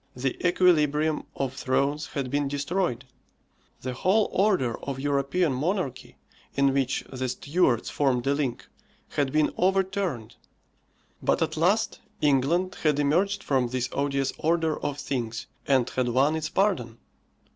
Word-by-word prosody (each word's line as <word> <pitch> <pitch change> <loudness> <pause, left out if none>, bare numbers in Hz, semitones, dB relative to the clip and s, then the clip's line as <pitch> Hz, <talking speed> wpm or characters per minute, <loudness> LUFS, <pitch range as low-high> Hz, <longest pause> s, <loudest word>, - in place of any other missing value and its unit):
The 130 +1 -1
equilibrium 155 -4 +3
of 135 -2 -2
thrones 140 +3 0
had 135 -3 -4
been 145 0 +1
destroyed. 145 -1 -1 0.8
The 130 0 -3
whole 195 - +2
order 185 - +1
of 135 -1 -5
European 140 +3 +1
monarchy, 135 -4 -2 0.4
in 140 -1 +3
which 135 -1 0
the 130 0 -2
Stuarts 135 -1 +1
formed 130 -4 +1
a 140 - +3
link, 140 -4 -2 0.4
had 140 -2 0
been 155 +1 +2
overturned. 190 - 0 0.8
But - - +2
at 160 0 -2
last 185 +8 +1 0.2
England 150 +6 +2
had 150 -3 +2
emerged 185 +8 +1
from 130 -3 +1
this 125 0 -2
odious 140 -1 0
order 160 -1 +1
of 145 -1 -3
things, 120 -5 -3 0.2
and 130 -3 +3
had 125 -1 0
won 135 +6 +3
its 155 -1 -2
pardon. 160 - 0
145 Hz, 135 wpm, -26 LUFS, 130-170 Hz, 0.8 s, equilibrium